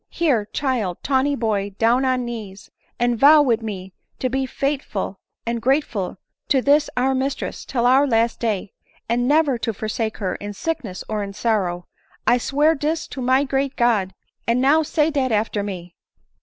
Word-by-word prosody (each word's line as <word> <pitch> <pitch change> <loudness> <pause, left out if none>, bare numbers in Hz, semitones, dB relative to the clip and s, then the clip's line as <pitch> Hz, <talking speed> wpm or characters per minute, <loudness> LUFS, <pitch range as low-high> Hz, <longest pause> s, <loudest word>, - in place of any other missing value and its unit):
Here, 275 -11 +1
child, 225 -7 -2
tawny 280 +1 +2
boy, 205 -5 -1
down 240 +4 +3
on 255 -1 +1
knees, 210 -5 -8 0.3
and 240 -1 +1
vow 295 +3 +8
wid 235 -4 +1
me 190 -4 -6 0.2
to 255 - -1
be 265 0 0
faith 275 +1 -1
ful 195 -1 -5 0.3
and 235 0 -2
grateful 240 -8 0 0.3
to 275 - +3
this 290 +3 +3
our 260 +2 +2
mistress, 265 +1 -3
till 240 -3 -1
our 265 +3 +5
last 230 -2 +1
day; 210 -4 -2 0.3
and 245 +2 +1
never 290 -4 +3
to 225 - -1
forsake 220 +1 -3
her 190 -4 -2
in 205 0 -6
sickness 245 - -4
or 215 -1 -2
in 200 -1 -5
sorrow! 190 -5 -1 0.4
I 245 - +4
swear 295 +6 +2
dis 310 +2 -2
to 265 - -6
my 260 +2 +3
great 275 0 -1
God: 210 -6 +1 0.3
and 235 +2 +2
now 280 +5 +4
say 310 0 +1
dat 270 -4 0
after 210 -1 0
me." 180 -4 -6
240 Hz, 175 wpm, -22 LUFS, 210-275 Hz, 0.4 s, vow